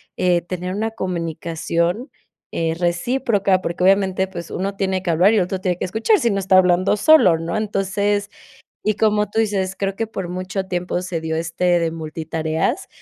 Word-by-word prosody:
eh, 180 -1 +2
tener 180 +1 -5
una 220 +3 -2
comunicación, 170 - -2 0.4
eh, 165 -1 -1
recíproca, 195 +2 +1
porque 175 0 -3
obviamente, 190 0 +3
pues, 170 -3 -8
uno 195 +2 -3
tiene 190 -1 -1
que 180 - -2
hablar 180 +6 +4
y - - +3
el 195 - +4
otro 185 +1 -3
tiene 180 -2 -1
que - - -4
escuchar, 220 - +2
si 235 - +1
no, 200 - 0
está 190 0 +2
hablando 185 +2 +4
solo, 205 - +5
¿no? 165 +5 -3
Entonces 205 0 -1 0.6
y, 215 - +2
como 210 -1 +2
tú 220 - -3
dices, 195 -4 0
creo 195 -1 -1
que 225 +2 -3
por 190 -5 -5
mucho 185 +2 -4
tiempo 180 -1 -2
se 180 -2 -3
dio 160 0 -2
este 170 +2 +1
de 165 -1 -1
multitareas, 160 0 -2
185 Hz, 185 wpm, -20 LUFS, 170-200 Hz, 0.6 s, solo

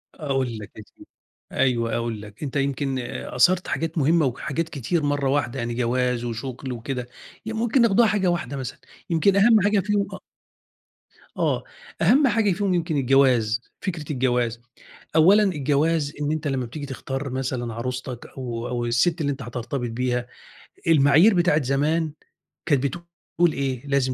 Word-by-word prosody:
أقول 135 -6 -2
لك 105 0 -10
يا 110 - -8
سيدي. - - -16 0.4
أيوه، 115 -3 +1
أقول 115 -3 -3
لك. 105 +5 -11
أنت 140 -2 -5
يمكن 135 -1 -1
أثَرَت 175 +8 +1
حاجات 165 +1 -2
مهمة 160 +2 +3
وحاجات 140 +5 -2
كتير 150 +4 -2
مرّة 145 -1 0
واحدة، 135 -2 0
يعني 120 0 -2
جواز 125 0 0
وشُغل 125 +2 -5
وكده 125 +1 -4 0.4
ي 225 - -4
ممكن 235 +3 +2
ناخدوها 230 0 +5
حاجة 205 -3 +1
واحدة 170 -6 -1
مثلًا، 130 -1 -6 0.3
يمكن 175 +4 +3
أهَم 215 +2 +6
حاجة 205 +1 +3
فيهم 205 +1 0
أ - - -10 1.2
آه. - - 0 0.4
أهَم 275 +3 +5
حاجة 225 -4 +2
فيهم 195 +1 0
يمكن 165 -3 0
الجواز، 125 -4 +3 0.2
فكرة 165 -6 -4
الجواز. 120 -3 0 0.6
أولّا 190 +7 +6
الجواز 150 -3 +1
إن 145 0 0
أنت 155 -1 -2
لمّا 135 -3 -1
بتيجي 145 +5 -7
تختار 135 0 -5
مثلًا 125 -2 -3
عروستك 125 +1 -5
أو 120 -2 -4
أو 120 -1 -2
السِت 145 +9 +1
اللي 145 -2 0
أنت 140 0 -6
هترتبط 120 +1 -4
بيها، 125 +1 -1 0.6
المعايير 160 +6 +6
بتاعة 175 -4 +3
زمان 150 +4 0 0.5
كانت 145 -5 +2
بتقول 170 +2 -2
إيه، 135 -1 -3
لازم 135 -2 +1
140 Hz, 155 wpm, -24 LUFS, 125-165 Hz, 1.2 s, أهَم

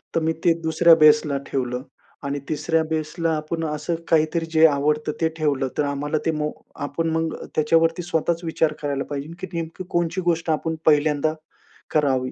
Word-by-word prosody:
तर - - +4
मी 160 +1 +1
ते 170 - +6
दुसऱ्या 165 +1 +5
बेसला 150 -2 +5
ठेवलं 125 -2 -2 0.4
आणि 140 0 -2
तिसऱ्या 160 +1 +1
बेसला 160 +1 -1
आपण 160 +2 -4
असं 150 +2 -2
काहीतरी 165 +1 +2
जे 160 0 +6
आवडतं, 150 +1 0
ते 160 - +3
ठेवलं. 145 -4 0
तर - - +2
आम्हाला 145 +2 -1
ते 165 - +2
मो 150 -1 -2 0.3
आपण 165 +3 -2
मग 160 -1 -1 0.2
त्याच्यावरती 165 +2 +2
स्वतःच 170 0 -1
विचार 160 -1 0
करायला 140 -2 -1
पाहिजे 145 0 -4
ना 165 - -9
की 185 - -4
नेमकी 165 +2 -4
कोणची 170 +2 0
गोष्ट 165 -1 0
आपण 160 +1 -1
पहिल्यांदा 150 0 +3 0.6
करावी. 135 -4 +1
155 Hz, 170 wpm, -23 LUFS, 150-165 Hz, 0.6 s, ते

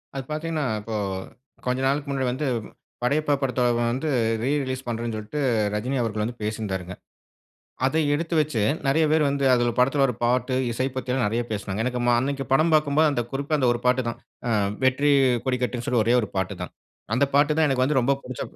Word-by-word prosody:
அது 135 - -3
பார்த்தீங்கன்னா, 155 -1 -2 0.2
இப்பொ 110 +1 -5 0.7
கொஞ்ச 125 +1 0
நாளைக்கு 140 +1 -1
முன்னாடி 135 -2 -1
வந்து, 140 +3 -2 0.6
படையப்பா 145 +3 +2
படத்த 125 -1 0 0.2
வந்து 125 +6 -1 0.3
ரீ 135 - +1
ரிலீஸ் 130 0 -4
பண்ணுறேன்ன்னு 115 -1 -3
சொல்லிட்டு, 110 +8 -5 0.3
ரஜினி 125 +6 -1
அவர்கள் 110 -2 -1
வந்து 120 +1 -5
பேசியிருந்தாங்க. 95 -4 -3 0.9
அதை 155 +4 +1
எடுத்து 165 +3 -2
வைச்சு, 150 -8 0 0.3
நெறைய 155 +3 +3
பேர் 155 -2 +3
வந்து 140 0 -1
அத 120 -1 +2
படத்தில 135 +3 +3
வர 125 -3 +2
பாட்டு, 125 +1 +1 0.2
இசை 130 +3 -1
பத்திலாம் 130 -1 -1
நெறைய 115 +3 0
பேசினாங்க. 100 0 -3
எனக்கு 125 -1 -1
ம 120 - +4
அன்னைக்கு 135 +1 -2
படம் 160 +4 +3
பாக்கும்போது, 155 +1 +4
அந்த 120 - 0
குறிப்பா 140 +3 -3
அந்த 130 - +2
ஒரு 120 - -4
பாட்டு 125 0 +3
தான். - - -7 0.3
ஆ - - 0 0.4
வெற்றி 140 +3 +3 0.3
கொடிக்கட்டுன்னு 125 -1 -1
சொல்லி 125 -3 +2
ஒரே 120 +2 +4
ஒரு 105 - -4
பாட்டு 95 +1 -1
தான். 90 - -5 0.4
அந்த 135 +4 +3
பாட்டு 145 +1 +4
தான் 160 -1 +4
எனக்கு 130 -2 +2
வந்து 140 -2 +2
ரொம்ப 140 +3 +3
புடிச்ச 130 -1 -7
130 Hz, 190 wpm, -24 LUFS, 120-140 Hz, 0.9 s, ம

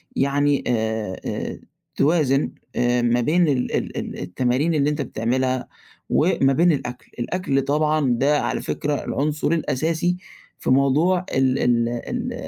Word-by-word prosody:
يعني 140 +1 +1
آآ، 110 -4 -1
آآ، - - -4 0.4
توازن 145 -2 +2 0.2
آآ، 120 0 +2
ما 120 0 +2
بين 165 +7 +3
ال 130 -4 0
ال - - -4
ال - - -5
التمارين 130 - 0
اللي 145 -1 +2
أنت 150 0 -2
بتعملها 130 +1 -1 0.4
وما 135 0 +3
بين 170 +4 +4
الأكل، 125 -4 -4
الأكل 135 0 0
طبعًا 150 0 +1
ده 145 +2 +3
على - - -2
فكرة 150 0 -2
العنصر 150 +1 -1
الأساسي 165 +2 0 0.4
في - - -3
موضوع 150 +8 +3
ال 130 0 +2
ال 115 -1 +2
ال 240 - -4
140 Hz, 140 wpm, -22 LUFS, 125-155 Hz, 0.4 s, بين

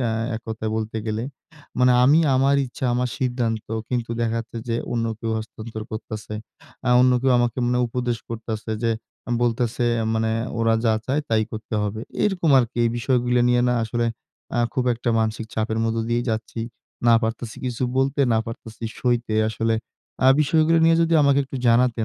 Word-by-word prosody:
অ্যা 120 -3 0 0.3
এক - - -7
কথায় 110 0 -3
বলতে 110 0 -3
গেলে। 110 +1 -2 0.6
মানে 125 0 +5
আমি 145 +5 +6 0.2
আমার 135 +2 +3
ইচ্ছা 125 +1 -7
আমার 125 +1 0
সিদ্ধান্ত 120 -4 -1 0.2
কিন্তু 120 -2 -2
দেখাচ্ছে 115 0 -2
যে 115 - 0 0.2
অন্য 115 -1 0
কেউ 115 - -2
হস্তান্তর 110 0 -7
করতেছে। 110 -1 -6 0.5
অ্যা 130 - 0
অন্য 125 0 +5
কেউ 135 - +3
আমাকে 120 +1 0
মানে 125 0 +1
উপদেশ 120 0 -2
করতেছে 110 -1 -5
যে, 115 - +2 0.5
বলতেছে। 120 0 0 0.3
মানে 110 0 +1 0.3
ওরা 115 0 +3
যা 110 - +4
চায় 140 +3 +1
তাই 110 -1 +2
করতে 110 +1 -6
হবে। 105 +1 -3 0.2
এরকম 185 -6 +1
আরকি। 120 -1 -1
এই 115 - +2
বিষয়গুলো 125 0 +1
নিয়ে 120 0 +3
না 125 - +2
আসলে 120 +1 -1 0.5
অ্যা 120 - +1
খুব 130 - 0
একটা 120 +1 -2
মানসিক 110 0 -2
চাপের 110 0 -1
মধ্যে 115 0 0
দিয়েই 120 0 0
যাচ্ছি। 110 +1 -4 0.5
না 115 - +7
পারতেছি 110 0 -3
কিছু 125 0 -3 0.2
বলতে। 135 +2 +1
না 110 - +3
পারতেছি 115 0 -9 0.2
সইতে 120 -3 0
আসলে 115 0 0 0.5
অ্যা 130 - +5
বিষয়গুলো 160 +2 +3
নিয়ে 165 0 +5
যদি 165 0 +2
আমাকে 140 -1 +4
একটু 135 0 -7
জানাতেন, 115 -1 +3
120 Hz, 175 wpm, -23 LUFS, 110-125 Hz, 0.6 s, না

